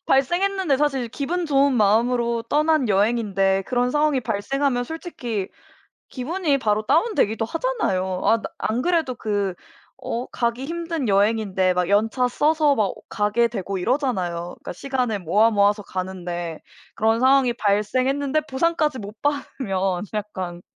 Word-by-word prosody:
발생했는데 350 +3 +2
사실 270 -4 0
기분 330 +8 -2
좋은 280 -1 +3
마음으로 235 +2 +2
떠난 305 -4 +2
여행인데 195 -2 +2
그런 245 0 +1
상황이 295 -1 +2
발생하면 245 +4 -1
솔직히 245 - -5 1.0
기분이 275 - +5
바로 215 -3 0
다운되기도 275 - +2
하잖아요. 195 - -1
아 225 - +5
나 - - -18
안 230 +3 -1
그래도 330 -7 0
그 205 -4 -1 0.5
어 240 +2 -2
가기 235 +2 -2
힘든 330 -3 -3
여행인데 200 -2 +2
막 180 -1 0
연차 220 +6 +2
써서 300 +3 +2
막 210 -5 +1
가게 210 +3 +1
되고 195 -4 -4
이러잖아요. 185 - -1
그니까 - - -8
시간을 250 -1 -2
모아, 205 +6 +3
모아서 205 0 +2
가는데 180 -3 -5 0.4
그런 225 +1 +2
상황이 260 -1 +4
발생했는데 255 +8 +1
보상까지 300 0 0
못 210 +1 -8
받으면 195 -10 -1
약간 185 -4 -5
235 Hz, 325 characters per minute, -23 LUFS, 200-275 Hz, 1.0 s, 기분이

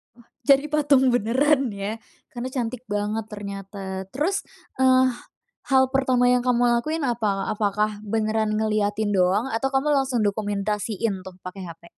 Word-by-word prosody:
Wah, 235 -1 -21 0.2
jadi 280 +1 +5
patung 280 -3 +4
beneran 260 +3 +2
ya 200 +2 -4 0.4
karena 245 0 -5
cantik 245 0 -3
banget 210 +1 -2
ternyata. 195 -1 -6
Terus, 340 +9 -1 0.4
eee, 260 0 +5 0.6
hal 265 0 +6
pertama 255 -2 +3
yang 250 0 +3
kamu 245 -1 +2 0.2
lakuin 310 +3 -3
apa? 210 -5 -1
Apakah 210 0 -1
beneran 215 0 0
ngeliatin 215 -1 0
doang, 190 +7 +2
atau 270 +4 0
kamu 270 +2 +1
langsung 265 -3 +1
dokumentasiin 205 0 -2
tuh 190 -1 -10
pake 185 +1 -7
HP? 170 -1 -10
220 Hz, 140 wpm, -24 LUFS, 205-260 Hz, 0.6 s, hal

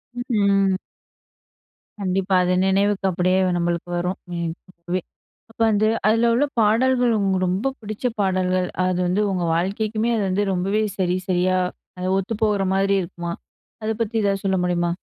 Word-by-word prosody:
ம், 245 - -3 0.3
ம். 195 -1 +3 1.2
கண்டிப்பா, 190 0 0
அது 180 0 +1
நினைவுக்கு 195 +1 +1
அப்படியே 185 +1 +2 0.2
நம்மளுக்கு 170 0 -2
வரும். 180 +2 -2 0.2
ம் 170 -1 -2
இப்பவே 180 0 -5 0.5
இப்போ 225 - -1
வந்து 215 0 +2 0.2
அதுல 225 +2 +3
உள்ள 245 +5 +3 0.2
பாடல்கள், 240 +3 +3
உங்களுக்கு 190 -2 +1
ரொம்ப 195 +9 0
பிடிச்ச 215 +2 -6
பாடல்கள் 185 -2 +1 0.2
அது 185 -1 0
வந்து 185 +4 +1
உங்க 180 -2 -1
வாழ்க்கைக்குமே 215 +6 -1
அது 215 - 0
வந்து 190 +2 +1
ரொம்பவே 195 +4 0
சரி 180 -1 +1
சரியா 185 0 +2 0.4
அது 185 0 -2
ஒத்து 195 +4 -2
போகுற 205 -2 +2
மாதிரி 195 +1 +2
இருக்குமா? 170 -1 -5 0.5
அதை 220 +1 0
பத்தி 230 0 -1
ஏதாவது 195 -1 0
சொல்ல 190 -1 +2
முடியுமா? 175 -1 0
190 Hz, 150 wpm, -22 LUFS, 180-210 Hz, 1.2 s, ம்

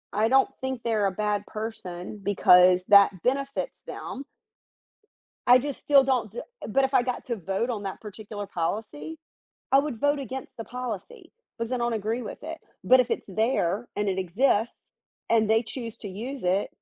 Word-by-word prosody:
I 215 +2 +2
don't 265 +3 +4
think 260 -2 -3
they're 220 -3 +1
a - - -1
bad 210 +1 -1
person 215 -4 -6
because 180 -2 +5
that 200 -3 +6
benefits 275 - -1
them. 270 - -6 1.2
I 245 +1 +9
just 280 +2 -4
still 280 -2 +5
don't 255 -6 0
d 235 - -5 0.3
but 270 +5 +2
if 265 - -4
I 255 - +5
got 250 0 -3
to 240 - -2
vote 195 +4 -2
on 215 -4 -3
that 195 -1 -6
particular 210 -1 -7
policy, 220 - -4 0.5
I 270 - +6
would 280 -4 -1
vote 285 0 +2
against 265 0 -7
the 225 - -6
policy 250 - -7 0.3
because 230 +1 -3
I - - +1
don't 240 0 0
agree 225 +3 -2
with 220 - -7
it. 325 +1 -6 0.3
But 255 +7 +7
if 250 -1 -1
it's - - -2
there 220 0 0
and 205 0 0
it 190 -1 -1
exists 210 +5 +1 0.5
and 220 -2 +3
they 225 +1 +4
choose 230 -1 -7
to 205 - -7
use 240 +8 -6
it, 185 +3 +1
225 Hz, 180 wpm, -26 LUFS, 205-260 Hz, 1.2 s, I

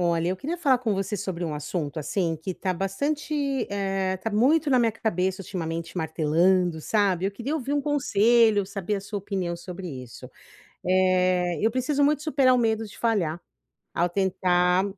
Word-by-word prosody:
Olha, 170 -1 +1
eu 185 - -1
queria 310 - -4
falar 275 -7 +3
com 230 -4 -1
você 195 +2 -2
sobre 180 -2 -4
um 160 - -3
assunto, 150 +1 -4
assim, 165 +2 -1
que 170 +4 -5
tá 185 +1 -2
bastante, 280 - -2
eh, 195 -1 -1
tá 225 - -3
muito 280 +8 +3
na 255 - +5
minha 230 -2 +2
cabeça, 190 -3 -1
ultimamente, 165 -2 -5
martelando, 165 +2 +2
sabe. 195 -1 +1
Eu 195 - 0
queria 245 +8 -4
ouvir 280 -3 -3
um 290 - +2
conselho, 230 -6 +3
saber 195 +1 -3
a - - -4
sua 200 +1 -5
opinião 190 -3 -3
sobre 180 +1 -8
isso. 130 -5 -9 0.5
Eh, 185 -2 +2
eu 225 - +4
preciso 265 +4 0
muito 290 0 +2
superar 275 -4 +3
o - - +3
medo 225 -2 +1
de 205 - -14
falhar, 180 -8 0 0.5
ao 175 - +1
tentar 180 -1 +2
195 Hz, 175 wpm, -25 LUFS, 175-235 Hz, 0.5 s, na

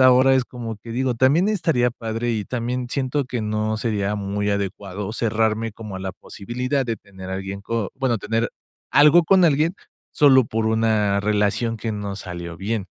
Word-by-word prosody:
ahora 130 +1 +6
es 130 -1 +2
como 115 -3 -6
que, 115 +3 -10
digo, 125 0 0
también 140 - +3
estaría 160 - +2
padre 115 0 -3
y 105 -2 -2
también 125 +1 -3
siento 135 +1 -1
que 125 -2 -3
no 110 0 -1
sería 105 -2 -1
muy 100 0 -2
adecuado 100 0 -3
cerrarme 110 -1 0
como 105 -3 -8
a - - -5
la 95 0 -4
posibilidad 125 +6 -3
de 115 -2 -1
tener 95 -2 -11
alguien 95 +1 -4
co 115 -2 -2
bueno, 130 -5 0
tener 115 +3 -1 0.4
algo 150 +4 +7
con 185 0 +5
alguien 160 +3 +3 0.4
solo 135 -4 +6
por 110 0 -2
una 110 -3 +2
relación 105 +2 +1
que 115 - -3
no 100 -1 -4
salió 85 -3 -7
bien. 100 +1 -3
115 Hz, 175 wpm, -22 LUFS, 105-125 Hz, 0.4 s, algo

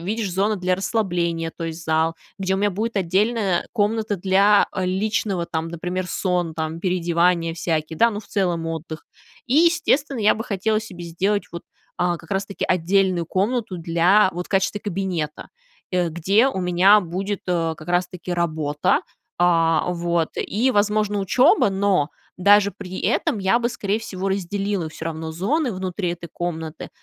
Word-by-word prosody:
видишь, 205 +3 -2
зона 200 +3 +1
для 180 0 0
расслабления, 175 -6 -1
то 165 - -4
есть, 165 0 -6
зал, 160 +1 +1 0.2
где 190 0 0
у - - 0
меня 205 +1 +1
будет 215 +3 -3
отдельная 195 +1 +1
комната 215 -1 0
для, 195 +3 +4
э, 185 - -1
личного, 190 -2 -1
там, 160 0 -3
например, 180 +2 -4
сон, 180 -3 -1
там, 160 0 -3
переодевания 170 -2 +1
всякие, 160 -2 -2
да, 230 0 +5
ну, 205 0 -5
в - - -17
целом 175 -5 0
отдых. 160 -1 -6 0.4
И, 250 - 0
естественно, 310 -5 +3
я 210 - +5
бы 225 - -5
хотела 215 0 0
себе 190 -6 -9
сделать, 190 +4 0
вот, 170 - -6 0.3
а, 175 -1 +1
как 165 - -16
раз 195 0 -1
таки 200 - -4
отдельную 185 -1 +1
комнату 210 +1 -1
для, 170 +5 +3
вот, 175 +1 -5
в - - -24
качестве 195 +1 0
кабинета, 180 -6 -3 0.4
э, 180 -2 +1
где 190 +9 +2
у 190 - -3
меня 180 +4 +5
будет, 190 +3 -3
э, 165 -2 0
как 155 - -12
раз 175 0 +2
таки 180 0 -6
работа, 155 -4 0 0.4
а, 165 -2 +3
вот, 170 -1 0
и, 240 +6 0
возможно, 210 -1 +1
учеба, 200 +3 +4
но 190 -6 +1 0.3
даже 200 +2 +5
при 185 -1 -8
этом 220 - 0
я 195 +4 +2
бы, 235 0 0
скорее 205 -3 -2
всего, 195 -4 -4
разделила 195 -1 -2
всё 160 - -9
равно 160 0 -4
зоны 245 - 0
внутри 185 -1 -3
этой 170 0 -8
комнаты, 160 -2 -5
185 Hz, 170 wpm, -22 LUFS, 170-205 Hz, 0.4 s, да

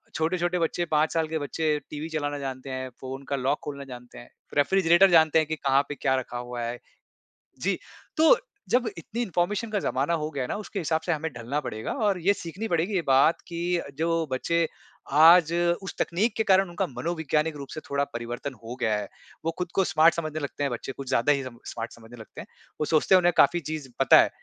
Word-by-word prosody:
छोटे-छोटे 175 +2 0
बच्चे, 170 +1 0
5 155 0 +1
साल 160 -1 +1
के 160 0 -2
बच्चे 150 +1 -1
टीवी 150 +2 -5
चलाना 145 -2 -2
जानते 135 0 -6
हैं, 130 0 -4
फ़ोन 135 +1 -6
का 140 - 0
लॉक 135 +2 0
खोलना 140 -1 -6
जानते 125 -2 -11
हैं, 120 - -12 0.3
रेफ्रिजरेटर 180 +4 +5
जानते 160 -1 +6
हैं 155 - 0
कि 155 - -2
कहाँ 140 -2 +2
पे 145 - -4
क्या 130 0 +1
रखा 125 -1 -4
हुआ 120 0 -5
है। 120 +1 -3 0.8
जी, - - 0 0.4
तो 320 +9 +6 0.3
जब 245 -2 +2
इतनी 215 +8 -5
इन्फॉर्मेशन 205 +2 -1
का 205 - +1
ज़माना 140 +3 0
हो 155 - -2
गया 135 -4 -2
ना - - -3
उसके 200 - -5
हिसाब 160 -1 0
से 175 - 0
हमें 160 0 -2
ढलना 120 +5 -3
पड़ेगा। 110 -5 -5 0.2
और 190 -3 +1
ये 195 +4 +4
सीखनी 195 +4 -6
पड़ेगी 175 +3 0
ये 180 - +2
बात 135 +5 +4
कि 175 0 -1 0.2
जो 165 +1 +1 0.2
बच्चे 165 +5 +1 0.5
आज 165 0 +8 0.3
उस 190 - -6
तकनीक 205 +6 0
के 220 - +2
कारण 190 -1 +4
उनका 180 +2 -2
मनोवैज्ञानिक 155 +3 -1
रूप 140 - -7
से 155 - -5
थोड़ा 140 0 +1
परिवर्तन 120 +3 -5
हो 120 +2 -6
गया 110 -1 +2
है। 105 -1 -4 0.4
वो 165 - +1
ख़ुद 180 -1 -3
को 195 - +4
स्मार्ट 160 +2 +6
समझने 155 -2 -3
लगते 145 0 -4
हैं 140 - 0
बच्चे, 120 +2 -4
कुछ 135 0 -9
ज़्यादा 120 +5 +3
ही 140 -2 +1
स्मार्ट 115 -1 -7
समझने 115 +1 -14
लगते 110 - -10
हैं। - - -12 0.3
वो 150 - +2
सोचते 160 +5 +4
हैं 185 - +7
उन्हें 175 0 +3
काफ़ी 175 - +5
चीज़ 155 -3 -6
पता 135 - +7
है, - - +1
155 Hz, 215 wpm, -26 LUFS, 135-175 Hz, 0.8 s, आज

